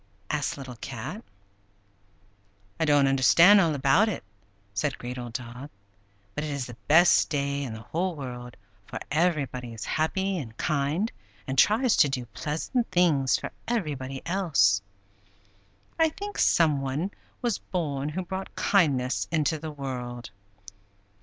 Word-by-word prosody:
asked 145 -2 -1
Little 130 -3 -8
Cat. 135 - -6 1.6
"I 160 - +2
don't 145 -2 +4
understand 165 +9 +6
all 165 -4 +2
about 140 +11 +4
it," 195 - -4 0.5
said 135 +8 -1
Great 125 +1 -6
Old 120 -2 -7
Dog; 125 +3 -7 0.6
"but 150 - -3
it 155 - -3
is 140 -3 -3
the 120 - -9
best 170 +4 +6
day 140 -2 -1
in 130 -5 -4
the 110 - -8
whole 175 +5 -2
year, 125 -2 -6 0.4
for - - -6
everybody 140 -7 0
is 110 - -6
happy 190 +4 0
and 115 -6 -8
kind, 155 +8 0 0.3
and 130 - -3
tries 220 - +4
to 145 - +5
do 125 -2 -3
pleasant 150 - -2
things 165 -7 +3
for - - -6 0.2
everybody 140 - -3
else. 140 - +3 1.2
I 325 0 +5
think 410 +6 -7
some 155 -5 +4
one 140 +8 -2 0.3
was 235 -4 0
born 145 -5 -3
who 180 +4 -4
brought 190 +2 -6
kindness 140 -10 +2
into 160 -1 +1
the 160 +1 -5
world." 125 -5 -6
145 Hz, 140 wpm, -27 LUFS, 130-175 Hz, 1.6 s, understand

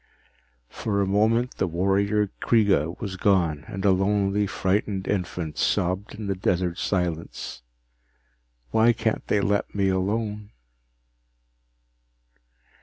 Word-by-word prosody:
For 100 -2 -2
a 100 - +2
moment, 110 +5 +1
the 95 - +1
warrior 100 +4 +1
Kreega 100 -8 +2
was 100 -6 -5
gone 85 -7 +1
and 95 -2 -5
a 100 - +6
lonely, 100 +1 +1
frightened 95 0 -1
infant 90 -5 -3
sobbed 95 +5 0
in 105 0 -6
the 100 - 0
desert 90 -2 -1
silence. 85 -8 -3 1.1
_Why 115 +1 +4
can't 110 -2 -1
they 105 - +2
let 100 +1 0
me 100 -1 +2
alone? 105 +2 -2
100 Hz, 110 wpm, -25 LUFS, 95-105 Hz, 1.1 s, a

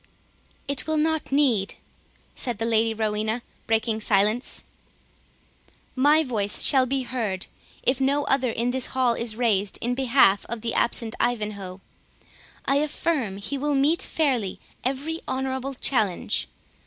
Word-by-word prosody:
"It 280 +1 -3
will 315 0 +1
not 315 -1 0
need," 255 -9 +2 0.6
said 240 -4 -3
the 225 - -1
Lady 225 0 +2
Rowena, 220 +1 -1 0.2
breaking 225 0 +1
silence; 210 +4 +2 1.3
"My 295 +4 +4
voice 205 -8 -1
shall 260 -3 +5
be 270 +1 0
heard, 225 -7 -3 0.4
if 260 +1 +1
no 280 +2 +2
other 265 -3 +1
in 235 +2 -1
this 260 0 +1
hall 250 -2 +3
is 230 -2 -3
raised 210 -4 +1
in 240 +1 -1
behalf 245 -6 +4
of 230 -1 -4
the 230 - -2
absent 230 -1 +2
Ivanhoe. 205 -5 -2 0.8
I 275 - +2
affirm 285 -7 -1
he 245 +8 -4
will 295 +1 0
meet 300 +7 +2
fairly 255 -11 0 0.2
every 285 +6 -2
honourable 265 +1 -2
challenge. 210 - 0
245 Hz, 135 wpm, -25 LUFS, 220-275 Hz, 1.3 s, shall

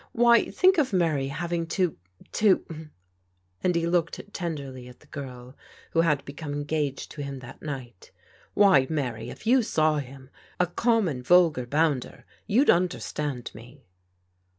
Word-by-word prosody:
Why, 235 0 +4
think 370 -1 +4
of 270 -5 +1
Mary 160 -7 +1
hav 170 +5 -4
ing 170 -1 -1
to 180 -4 +1 0.2
— - - -24
^to 165 -7 +1 0.4
" 90 0 -41
and 180 -1 +2
he 170 0 +1
looked 170 +3 -1
tenderly 140 -8 -5
at 125 - -14
the - - -19
girl 125 -2 -9 0.4
who 165 - +3
had 150 -4 +1
become 145 +1 -6
engaged 145 -1 -2
to 150 - -7
him 140 -1 -5
that 130 +2 -12
night. 130 -10 -7 0.5
"Why, 190 -10 +5
Mary, 125 -8 -3
if - - -11
you 250 +3 +5
saw 155 -8 +1
him 135 0 -10
— - - -29
a 180 - +4
common, 185 - 0
vulgar 160 -4 +4
bounder, 145 -2 0 0.2
you'd 250 +8 +5
understand 150 -7 -2
me 120 +6 -14
150 Hz, 160 wpm, -26 LUFS, 130-175 Hz, 0.5 s, Why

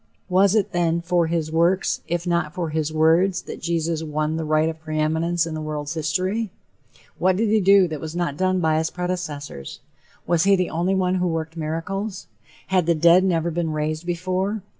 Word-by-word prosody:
Was 190 +2 +4
it, 210 -3 +1
then, 170 -1 +1
for 175 -1 +1
his 160 -2 -2
"works," 170 +4 +1
if 175 +1 -2
not 170 -2 -1
for 170 -4 -3
his 155 0 -1
"words," 165 +4 +3
that - - -8
Jesus 165 -1 -1
"won 155 0 -2
the 160 - -2
right 155 0 +2
of 160 0 -4
preeminence 160 +2 0
in 165 - -5
the 155 - -4
world's 150 -1 -4
history"? 185 +7 -1 0.7
What 185 0 +3
did 215 +3 +1
he 215 0 +3
do 195 0 +6
that 155 -4 -6
was 160 +1 -6
not 175 -5 -1
done 185 +3 +1
by 160 -2 +2
his 160 0 -1
predecessors? 165 - -5 0.5
Was 170 0 +2
he 200 0 +5
the 180 -2 -1
only 175 +4 0
one 185 -1 +1
who 180 - +1
worked 160 -1 -3
miracles? 185 +6 -4 0.4
Had 185 -3 +2
the 170 - +3
dead 170 +3 +5
never 170 -3 +1
been 165 -1 -2
raised 155 +2 -3
before? 185 +4 -2
170 Hz, 195 wpm, -23 LUFS, 160-185 Hz, 0.7 s, do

